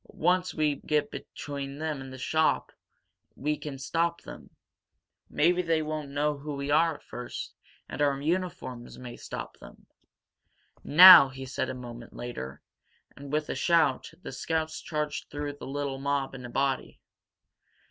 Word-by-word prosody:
Once 180 +2 +1
we 150 -2 0
get 150 0 -1
between 140 -1 -6
them 155 -3 -3
and 135 0 -9
the 130 - -8
shop, 155 +4 +1 0.6
we 150 +2 -1
can 145 -2 -7
stop 170 +5 -1
them. - - -11 0.8
Maybe 175 +4 +3
they 165 -2 +1
won't 155 -2 -4
know 145 +1 -1
who 145 0 -5
we 140 +1 -3
are 160 +1 +4
at - - -15
first, 125 -1 -7 0.3
and - - -5
our 140 -1 +2
uniforms 170 -6 -3
may 125 -1 -8
stop - - -8
them." - - -15 1.0
"Now!" 175 -2 +10
he 135 0 -8
said, 130 - -3
a - - -4
moment 120 -2 -9
later. 70 - -7 0.5
And, 140 0 -10
with 150 0 0
a - - 0
shout, 160 -6 +2
the - - -6
scouts 160 +3 -2
charged 150 -2 -3
through 145 0 -4
the - - -8
little 140 -1 -3
mob 140 -1 -1
in 125 -2 -8
a - - -7
body. 135 +1 -1
145 Hz, 155 wpm, -28 LUFS, 135-155 Hz, 1.0 s, Now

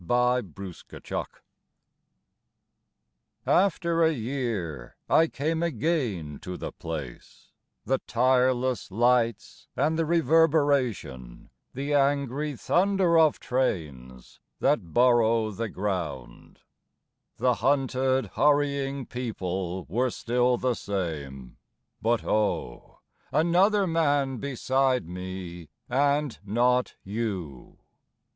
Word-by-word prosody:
IN - - -16
A 125 +1 +3
SUBWAY 95 0 -9
STATION - - -6 2.2
AFTER 170 -3 +2
a 160 - +4
year 110 - -4
I 165 - +4
came 160 +4 -2
again 120 - -1
to 90 -1 -7
the - - -5
place; 75 -7 -8 0.3
The 135 0 +1
tireless 130 0 +2
lights 115 +2 0
and 155 +4 +1
the 165 - +2
reverberation, 145 - +1 0.2
The 140 +3 -2
angry 140 +1 +1
thunder 180 +3 +2
of 155 -2 +4
trains 70 - -3 0.2
that 115 - +1
burrow 115 -3 +3
the 115 +2 -4
ground, 85 -12 -5 0.8
The 125 +1 +2
hunted, 130 0 +1
hurrying 140 -2 +1
people 95 -7 -4
were 125 +9 0
still 125 +1 +1
the 125 0 0
same 75 - -5 0.4
But 115 +1 +1
oh, 105 - -2 0.3
another 180 +7 +3
man 145 -6 +1
beside 130 -4 0
me 90 -2 -7 0.2
and 140 +1 +1
not 125 +4 +1
you! 95 - -5
125 Hz, 95 wpm, -27 LUFS, 95-145 Hz, 2.2 s, a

